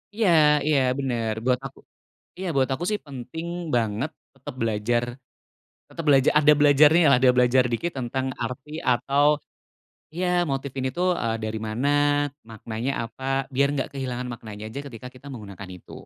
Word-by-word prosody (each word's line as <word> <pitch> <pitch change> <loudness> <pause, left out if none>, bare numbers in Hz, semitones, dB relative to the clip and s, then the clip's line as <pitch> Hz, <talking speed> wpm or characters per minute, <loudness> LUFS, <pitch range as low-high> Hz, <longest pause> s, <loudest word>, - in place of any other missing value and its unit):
Iya 215 -3 +2 0.4
iya 150 -3 +4 0.2
bener, 120 -5 -1
buat 125 -1 +2
aku 135 - -9 0.6
iya 190 - -4
buat 130 -1 +3
aku 160 +6 -2
sih 210 - 0
penting 140 +5 -7 0.3
banget 115 +5 -1 0.2
tetep 135 -1 -9
belajar 115 +2 0 0.9
tetep 165 - -7
belaja 135 -1 +5
ada 150 0 +6
belajarnyalah, 145 0 +6
ada 130 - +7
belajar 125 +1 +4
dikit 170 +9 -1
tentang 130 +1 -2 0.2
arti 130 +4 -6 0.2
atau 135 +4 +1 0.9
iya 180 +2 -1 0.2
motif 135 0 -3
ini 130 - -1
tuh, 180 +1 +1
eee, 115 -1 0
dari 110 0 -3
mana, 120 +6 -2 0.6
maknanya 115 +4 -4 0.2
apa, 130 +3 -14 0.3
biar 140 +2 +3
nggak 135 -2 -2
kehilangan 125 -2 -4
maknanya 110 -2 -9
aja 125 - -6
ketika 120 -1 -9
kita 135 +3 -13
menggunakan 100 -4 -9
itu. - - -17
130 Hz, 155 wpm, -24 LUFS, 115-140 Hz, 0.9 s, ada